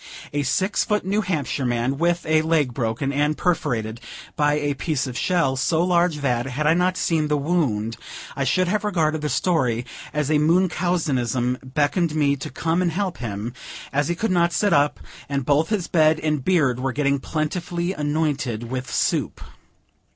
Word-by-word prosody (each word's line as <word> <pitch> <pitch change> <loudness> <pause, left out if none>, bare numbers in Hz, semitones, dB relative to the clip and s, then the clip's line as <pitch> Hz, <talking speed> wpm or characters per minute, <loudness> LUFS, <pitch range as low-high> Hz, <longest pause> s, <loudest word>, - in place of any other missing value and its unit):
A 145 - 0
six 185 - +1
foot 210 -3 -1
New 200 +3 +1
Hampshire 155 -8 -2
man, 120 +2 0
with 175 +1 +1
a 155 0 +3
leg 155 -5 +1
broken 120 +3 -2
and 150 +2 +1
perforated 120 - -1 0.3
by 145 0 +2
a 145 -1 0
piece 145 -1 -2
of 130 -2 -6
shell, 165 -3 +1
so 160 +5 +1
large 175 -4 +2
that, 125 -2 0
had 140 +4 -3
I 155 - +5
not 180 +2 +1
seen 160 -3 +1
the 150 0 +1
wound, 140 -9 0 0.4
I - - -1
should 185 0 +2
have 210 +4 0
regarded 160 -7 0
the 150 - -2
story 125 -11 +1 0.3
as 150 0 -1
a 150 - +4
Munchausenism, 150 -8 +1 0.2
beckoned 155 +2 +1
me 145 -2 +2
to 140 +2 -6
come 165 +3 -1
and 175 -2 +1
help 185 +1 -2
him, 115 0 -4 0.4
as 145 +1 +1
he 175 - -1
could 220 +4 -1
not 175 -1 +2
sit 205 +6 +2
up, 145 +1 +2 0.3
and 140 -2 -1
both 145 +3 +2
his 205 -5 -1
bed 155 -1 +3
and 150 -3 -1
beard 140 -9 +2
were 130 0 -1
getting 140 0 +1
plentifully 170 +4 -2
anointed 145 - -1
with 130 0 -4
soup. - - 0
150 Hz, 180 wpm, -23 LUFS, 135-175 Hz, 0.4 s, I